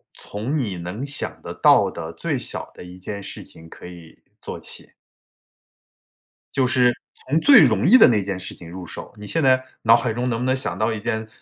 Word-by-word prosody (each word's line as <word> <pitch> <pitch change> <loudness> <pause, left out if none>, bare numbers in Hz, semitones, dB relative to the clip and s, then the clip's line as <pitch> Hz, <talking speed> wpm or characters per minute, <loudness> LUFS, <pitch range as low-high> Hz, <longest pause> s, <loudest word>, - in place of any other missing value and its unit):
从 110 +9 -5
你 110 -11 -2
能 90 +10 -6
想 140 0 -4
得 - - -7
到 - - +4
的 80 -1 -7
最 80 - -2
小 - - -4
的 - - -11
一 90 +1 -11
件 100 +2 -7
事 - - -8
情 80 0 -15
可 - - -13
以 85 -2 -12 0.2
做 - - -7
起。 - - -7 1.7
就 130 -1 +2
是， 125 -2 +3 0.4
从 155 - +3
最 275 - +8
容 110 -7 +2
易 240 +8 +8
的 - - +8
那 105 -5 +2
件 95 -1 -4
事 95 - -7
情 85 - -12
入 90 +1 -8
手。 80 - -9
你 105 - -9
现 165 +4 -1
在 130 -1 +4 0.2
脑 115 0 +7
海 120 -1 0
中 125 +2 -2
能 115 - -1
不 125 - -2
能 130 +1 +2
想 90 -9 -2
到 110 +2 0
一 110 - -4
件， 110 0 -3
110 Hz, 230 characters per minute, -22 LUFS, 90-130 Hz, 1.7 s, 最